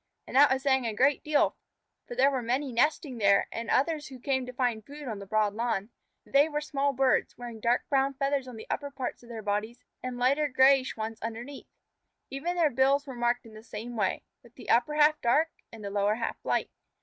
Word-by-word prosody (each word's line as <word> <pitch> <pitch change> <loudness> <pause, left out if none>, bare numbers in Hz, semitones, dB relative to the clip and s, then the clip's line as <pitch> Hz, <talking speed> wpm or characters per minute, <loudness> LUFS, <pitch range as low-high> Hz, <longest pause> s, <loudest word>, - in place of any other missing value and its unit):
And - - -9
that 285 +1 +7
was 265 0 0
saying 265 -3 +2
a 220 - -3
great 275 +5 +3
deal, 300 -1 +2 0.5
for 245 - -7
there 270 +3 +4
were 260 -2 -1
many 255 +4 -1
nesting 260 +1 0
there 200 -1 +4
and 230 0 -5
others 300 +2 +1
who 265 - -10
came 260 0 -1
to - - -5
find 245 -3 -1
food 290 +3 -10
on 220 -4 -4
the 200 - -9
broad 215 0 +1
lawn. 225 -1 -2 0.3
They 285 +3 +4
were 295 -1 -1
small 285 -2 -1
birds, 265 -3 +1
wearing 240 -2 -8
dark 235 +3 +1
brown 275 0 +1
feathers 275 -1 -1
on 250 - -8
the 220 - -9
upper 285 - -3
parts 265 -3 -5
of 240 - -16
their 225 -2 -7
bodies 210 +3 -2 0.2
and 255 -1 -5
lighter 275 +5 +2
grayish 265 -1 +4
ones 220 0 -5
underneath. 235 +5 -7 0.6
Even 315 +7 -3
their 325 -4 +3
bills 270 +3 +2
were 270 - -7
marked 240 0 0
in 225 - -13
the 215 - -11
same 225 +2 -7
way, 200 -4 -1 0.2
with 235 0 -20
the - - -4
upper 300 +6 +3
half 300 0 +4
dark 295 +7 +3 0.2
and 220 -2 -10
the 200 - -4
lower 205 +1 +1
half 230 0 -4
light. - - -1
255 Hz, 220 wpm, -28 LUFS, 230-280 Hz, 0.6 s, that